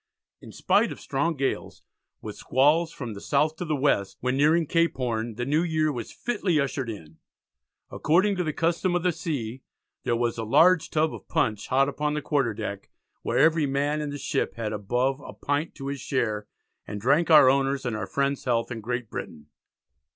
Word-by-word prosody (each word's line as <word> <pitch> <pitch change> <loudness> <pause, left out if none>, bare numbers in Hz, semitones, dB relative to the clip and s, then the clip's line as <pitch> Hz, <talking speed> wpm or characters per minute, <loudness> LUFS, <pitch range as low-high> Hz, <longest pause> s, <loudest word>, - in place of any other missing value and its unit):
In - - -11
spite - - +2
of - - -8
"strong 160 +5 -1
gales, 135 -1 -3 0.4
with - - -6
squalls 155 +5 +2
from 120 -8 -6
the 100 - -9
south 150 +2 +1
to 175 - -4
the 155 -2 0
west," 130 -9 0
when 125 +1 -1
nearing 155 +4 +3
Cape 165 +2 +1
Horn, 115 -3 -2
the 120 +2 -3
new 150 +4 +2
year 155 -3 +1
was 120 -5 -6
fitly 205 -9 -1
ushered 135 -3 -2
in. 80 -8 -9 0.7
According 190 +6 +2
to 180 - 0
the 155 - -1
custom 170 +3 0
of 175 - 0
the 180 - +3
sea 135 -7 -4 0.4
there 120 -2 +1
was 115 -1 -1
"a - - -2
large 160 +9 +4
tub 155 0 +1
of - - -10
punch 105 -2 0
hot 135 +1 +3
upon 150 +1 -2
the 150 - -2
Quarter 135 -7 0
Deck, 100 -2 -6 0.3
where - - -1
every 160 -2 +4
man 145 +2 0
in 150 - -3
the 145 - -5
ship 145 0 -2
had 110 -2 -3
above 125 +6 0
a - - -10
pint 145 +3 -2
to 135 - -8
his 140 0 -3
share, 110 -6 -1 0.4
and 105 0 -5
drank 140 +10 +2
our 155 -5 +8
owners 135 0 +2
and 120 -3 -1
our 110 - -4
friends 140 0 -1
healths 120 -1 0
in 115 -2 -5
Great 120 +1 -3
Britain." 75 -7 -8
140 Hz, 200 wpm, -26 LUFS, 120-155 Hz, 0.7 s, our